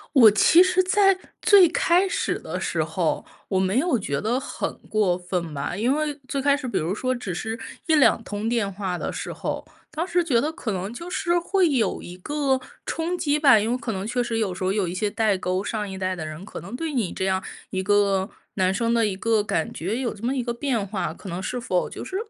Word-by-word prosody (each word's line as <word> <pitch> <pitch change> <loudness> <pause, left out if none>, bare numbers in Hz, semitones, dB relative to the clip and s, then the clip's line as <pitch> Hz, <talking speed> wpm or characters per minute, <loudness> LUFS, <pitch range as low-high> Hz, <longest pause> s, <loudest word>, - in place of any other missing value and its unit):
我 235 -5 +9
其 315 +11 +6
实 370 0 +4
在 390 +1 +4 0.2
最 400 -4 +7
开 355 +3 +3
始 385 - -1
的 - - -5
时 - - 0
候 - - -1 0.2
我 190 - +1
没 190 +5 +2
有 315 -3 +2
觉 140 -9 -2
得 235 +4 0
很 - - -4 0.2
过 205 -5 +2
分 180 -3 -3
吧。 140 - -3
因 225 +6 +1
为 305 -1 -1
最 280 - -2
开 280 +1 +3
始 285 -2 -5
比 240 - -1
如 165 +4 -1
说 255 +4 -1
只 205 -7 -4
是 220 +6 -4 0.3
1、2 300 -7 +4
通 205 +1 -4
电 225 -4 0
话 190 -2 -3
的 - - -3
时 - - -5
候， - - -4 0.2
当 330 +3 -3
时 355 -1 +2
觉 270 -8 +2
得 300 +6 0
可 320 -9 -4
能 195 +3 -3
就 340 +8 -7
是 350 -1 +1
会 370 +1 +2
有 255 -6 +1
一 175 - -9
个 275 +5 0 0.3
冲 335 +2 -2
击 300 -3 +1
吧。 275 -6 +7
因 220 +3 0
为 250 - +1
可 240 - -4
能 195 -1 -4
确 245 +2 0
实 230 -1 -2
有 210 -5 0
时 180 - -6
候 185 - +1
有 200 -2 0
一 170 - -4
些 205 +3 0
代 215 -1 +1
沟， 185 +1 -1
上 210 -1 -3
一 190 - -6
代 185 0 -1
的 165 - -5
人， 155 +4 -8
可 - - -8
能 195 +7 -7
对 315 +3 -3
你 230 -9 0
这 190 - -2
样 190 0 0 0.3
一 190 - -1
个 200 0 +2 0.3
男 185 -1 +2
生 230 +4 0
的 230 -1 +3
一 195 - -2
个 220 +2 +2
感 160 -5 -1
觉 195 +8 -2
有 250 -2 -2
这 215 0 -14
么 255 +3 0
一 255 - -1
个 235 0 -2
变 235 -4 -1
化， 200 0 -3
可 - - -11
能 180 0 -4
是 245 +6 -3
否 185 -7 0
就 - - -7
是 375 - -6
225 Hz, 260 characters per minute, -24 LUFS, 190-285 Hz, 0.3 s, 我